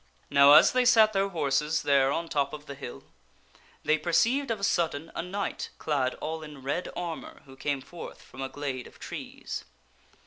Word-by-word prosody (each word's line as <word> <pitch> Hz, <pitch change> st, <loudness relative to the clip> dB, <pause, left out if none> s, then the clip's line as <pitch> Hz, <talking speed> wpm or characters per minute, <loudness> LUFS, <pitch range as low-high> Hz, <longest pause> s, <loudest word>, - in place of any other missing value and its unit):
Now 140 Hz, 0 st, +8 dB
as -, -, +8 dB
they 255 Hz, 0 st, +3 dB
sat 225 Hz, -3 st, +6 dB
their 195 Hz, 0 st, +1 dB
horses 150 Hz, -2 st, 0 dB
there 135 Hz, -1 st, +4 dB
on 165 Hz, +3 st, -2 dB
top 140 Hz, -2 st, 0 dB
of 150 Hz, 0 st, -8 dB
the 140 Hz, -, -7 dB
hill 135 Hz, -3 st, -8 dB, 0.8 s
they 155 Hz, 0 st, +2 dB
perceived 235 Hz, -, +2 dB
of 225 Hz, -2 st, -1 dB
a -, -, -9 dB
sudden 165 Hz, -4 st, 0 dB
a -, -, -2 dB
knight 195 Hz, +3 st, -4 dB
clad 140 Hz, -4 st, 0 dB
all 160 Hz, +1 st, -4 dB
in 150 Hz, -3 st, -10 dB
red 140 Hz, +7 st, -2 dB
armor 170 Hz, -2 st, -6 dB
who 135 Hz, -1 st, -14 dB
came 140 Hz, 0 st, -2 dB
forth 175 Hz, +5 st, -10 dB
from 130 Hz, -, -11 dB
a 135 Hz, -, -3 dB
glade 135 Hz, -3 st, -4 dB
of -, -, -17 dB
trees. -, -, -7 dB
150 Hz, 185 wpm, -28 LUFS, 140-175 Hz, 0.8 s, Now